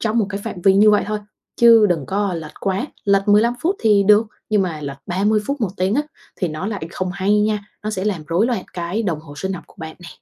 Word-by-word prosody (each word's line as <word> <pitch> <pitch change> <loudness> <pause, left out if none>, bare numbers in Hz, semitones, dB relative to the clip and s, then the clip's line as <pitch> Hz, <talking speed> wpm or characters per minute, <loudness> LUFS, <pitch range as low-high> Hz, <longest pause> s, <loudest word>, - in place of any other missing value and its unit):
trong 225 +1 0
một 215 - +2
cái 200 0 -4
phạm 180 - -5
vi 195 -1 +6
như 210 +2 +6
vậy 210 - +3
thôi, 215 0 -2 0.4
chứ 230 -2 +7
đừng 165 -8 -1
có 200 0 -1
lệch 160 -2 -7
quá, 195 +7 -1 0.2
lệch 200 0 +2
15 215 +4 +4
phút 370 +5 0
thì 210 -3 +4
được, 210 +2 +5 0.2
nhưng 210 -2 +3
mà 165 -4 -3
lệch 140 -1 -6
30 205 +4 +1
phút, 280 -2 -2
một 205 -5 0
tiếng 185 +3 +1
á, 290 - +2 0.3
thì 180 - -1
nó 155 +5 -5
lại 205 -5 -4
không 185 0 -3
hay 200 +2 +1
nha, 210 -1 0 0.2
nó 215 - -1
sẽ 190 -3 -3
làm 185 -7 -2
rối 175 +8 +2
loạn 235 -7 -2
cái 175 +5 -3
đồng 170 -7 -2
hồ 145 -2 -12
sinh 190 +3 -3
học 175 -2 -7
của - - -22
bạn 160 -2 -8
nè. 175 -1 -11
200 Hz, 265 wpm, -20 LUFS, 175-215 Hz, 0.4 s, chứ